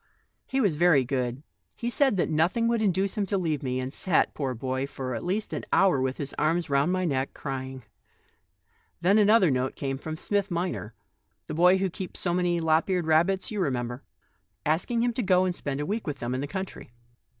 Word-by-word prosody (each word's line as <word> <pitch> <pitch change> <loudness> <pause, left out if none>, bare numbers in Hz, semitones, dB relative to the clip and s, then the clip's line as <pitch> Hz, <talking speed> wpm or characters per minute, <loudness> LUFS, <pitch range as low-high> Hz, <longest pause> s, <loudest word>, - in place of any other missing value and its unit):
He 265 - -1
was 195 - +2
very 160 -6 +4
good; 130 +1 -2 0.3
he 240 +1 -3
said 270 -5 +2
that 175 - +2
nothing 175 +9 +2
would 235 -1 +1
induce 195 -1 +1
him 200 - 0
to 200 - 0
leave 160 -6 -1
me, 130 -1 -2
and 130 +1 -4
sat, 175 -2 +1
poor 135 -4 -2
child, 130 +3 -3
for 130 -2 -5
at 115 - -3
least 200 +5 -2
an - - -3
hour 185 -9 +4
with 130 0 -1
his 140 -1 -4
arms 160 +1 +1
round 140 +5 +3
my 185 0 0
neck, 135 -4 -1
crying. 130 -2 -5 1.2
Then 195 +5 +4
another 210 -5 +5
note 130 0 -1
came 135 -1 -3
from 155 +2 -5
Smith 200 +3 -1
minor 170 - -3 0.2
— - - -48
the - - -6
boy 180 +4 +5
who 190 -1 -1
keeps 185 +1 -6
so 175 - 0
many 175 -1 +1
lop 160 +2 +2
eared 180 -3 +1
rabbits, 170 +6 +2
you 210 - -3
remember 125 -5 -2 0.3
— - - -46
asking 185 +10 +1
him 240 -1 +1
to 245 - -1
go 185 -3 +3
and 180 - 0
spend 140 -4 -4
a 145 - -2
week 210 +3 -3
with 145 -2 -3
them 120 0 -3
in 130 - -2
the 145 - -3
country." 190 - -6
165 Hz, 215 wpm, -27 LUFS, 135-190 Hz, 1.2 s, another